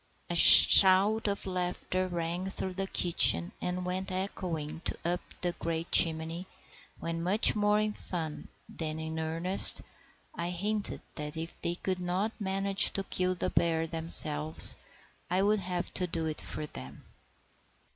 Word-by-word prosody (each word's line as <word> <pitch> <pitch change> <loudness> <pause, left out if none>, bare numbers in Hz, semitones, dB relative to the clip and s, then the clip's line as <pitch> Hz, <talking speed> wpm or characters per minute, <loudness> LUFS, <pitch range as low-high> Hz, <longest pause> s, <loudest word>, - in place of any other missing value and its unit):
* - - -38
A - - -3
shout 200 +3 +7
of 200 -1 -4
laughter 185 0 -4
rang 175 +1 -4
through 190 -1 -6
the 195 +1 -4
kitchen 120 - +3
and 180 0 -4
went 185 +1 -5
echoing 175 -5 -6 0.2
up 175 +1 -2 0.2
the 175 - -1
great 165 0 -5
chimney 165 +2 +3 0.5
when, 165 0 -5
much 195 +7 +3
more 210 0 +1
in 215 0 -2
fun 160 -7 -7 0.2
than 155 -1 -7
in 160 0 -6
earnest, 165 +4 +5 0.5
I 170 +1 -5
hinted 205 +4 -4
that 150 +1 -8
if 165 +1 -9
they 170 - -2
could 185 +1 -4
not 180 +4 -3
manage 195 0 +2
to 195 - -3
kill 185 -1 -2
the - - -3
bear 165 -1 0
themselves 155 -2 +1 0.5
I 185 +2 0
would 210 +1 +1
have 180 -2 -6
to 180 - -2
do 165 -1 -4
it 155 -1 -4
for 150 - -5
them. 65 - -12
180 Hz, 150 wpm, -28 LUFS, 165-190 Hz, 0.5 s, shout